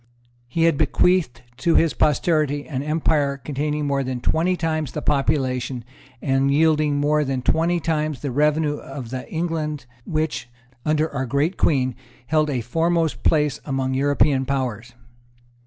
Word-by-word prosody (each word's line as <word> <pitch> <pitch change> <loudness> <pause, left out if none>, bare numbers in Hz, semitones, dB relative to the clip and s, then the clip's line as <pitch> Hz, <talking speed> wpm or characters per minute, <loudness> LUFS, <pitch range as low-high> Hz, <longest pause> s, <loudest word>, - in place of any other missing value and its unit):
He 165 +7 0
had 165 -3 +3
bequeathed 155 -3 +2
to 165 +5 +1
his 165 -2 +4
posterity 150 -1 +1
an 135 -3 -3
empire 150 -2 +1
containing 150 +2 -2
more 140 -1 0
than 130 -1 -3
twenty 170 +8 +1
times 155 -4 -2
the 150 - -3
population 130 -4 0 0.4
and 135 0 +2
yielding 155 0 +3
more 150 +1 +2
than 135 -2 -2
twenty 170 +4 +2
times 155 -4 -1
the 140 - -3
revenue 150 +2 +1
of 135 -5 -8
the 130 -1 -5
England 160 -4 -2 0.2
which, 155 -6 -2 0.4
under 155 +1 +2
our 135 -2 -2
great 145 +8 0
Queen, 130 -4 +1 0.3
held 155 +3 +1
a 130 -4 -1
foremost 165 +6 0
place 150 -2 +2
among 135 -2 -1
European 140 0 +2
powers. 120 -4 -2
145 Hz, 145 wpm, -22 LUFS, 135-155 Hz, 0.4 s, his